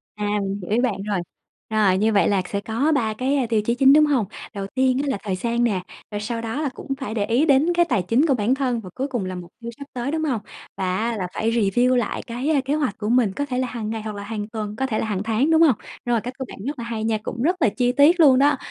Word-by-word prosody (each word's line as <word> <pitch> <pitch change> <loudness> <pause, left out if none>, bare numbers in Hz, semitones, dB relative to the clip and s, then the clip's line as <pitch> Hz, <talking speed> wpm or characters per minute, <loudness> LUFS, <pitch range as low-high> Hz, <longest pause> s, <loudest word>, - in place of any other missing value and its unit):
À, 210 0 -3 0.2
mình 195 +1 -3
hiểu 180 - -8
ý 220 - +3
bạn 230 -6 -1
rồi. 205 -2 -1 0.5
Rồi 205 -4 +3
như 215 +3 +2
vậy 200 - +4
là 200 -2 +2
sẽ 200 - -1
có 230 +9 0
3 225 -5 0
cái, 255 +6 0
a, 265 - +1
tiêu 220 -2 +2
chí 235 +3 0
chính, 270 +2 +6
đúng 305 +1 +6
hông? 270 -8 +1 0.3
Đầu 200 -2 -4
tiên 260 -1 +2
á, - - -3
là 265 - 0
thời 195 -3 -2
gian 235 +5 -1
nè, 205 -6 +1 0.3
rồi 205 0 -3
sau 230 +2 -3
đó 230 +6 -3
là 295 - 0
cũng 270 - -5
phải 260 -6 -4
để 210 -3 0
ý 240 +8 +2
đến 300 +3 +4
cái 345 0 +3
tài 205 - +1
chính 230 - +2
của 280 - +3
bản 240 +1 +1
thân 255 -4 -1
và 185 - -9
cuối 265 +2 -2
cùng 245 -8 -3
là 185 0 -4
mục 175 -1 -9
tiêu 235 0 -6
sắp 280 - -8
tới, 250 +2 -3
đúng 315 0 -1
hông? 260 -9 -1 0.4
Và 185 -1 -1
á, 230 +2 -1
là 185 -3 -2
phải 225 +1 0
review 235 +3 +2
lại 240 -4 -1
cái, 245 +5 -3
a, 305 -3 +3
kế 275 - 0
hoạch 290 -9 -1
của 210 0 -3
mình, 235 -5 +3
có 285 - -2
thể 255 -3 -3
là 255 - 0
hàng 230 -3 -5
ngày 225 0 -3
hoặc 215 -1 -6
là 200 - -6
hàng 210 0 -4
tuần, 215 -2 -5
có 265 - -1
thể 230 -5 -1
là - - -1
hàng 205 -3 -2
tháng, 225 +8 +1
đúng 320 0 +5
hông? 305 -7 +6 0.3
Rồi, 240 -2 +1
cách 250 +3 -6
của 265 - -4
bạn - - -10
rất 285 0 -4
là 235 - -4
hay 225 -2 -4
nha, 220 0 +1
cũng 230 - -5
rất 340 +8 +2
là 230 - +5
chi 245 +3 +1
tiết 295 +7 +5
luôn 270 -5 +7
đó. 285 0 +4
235 Hz, 305 wpm, -22 LUFS, 210-270 Hz, 0.5 s, luôn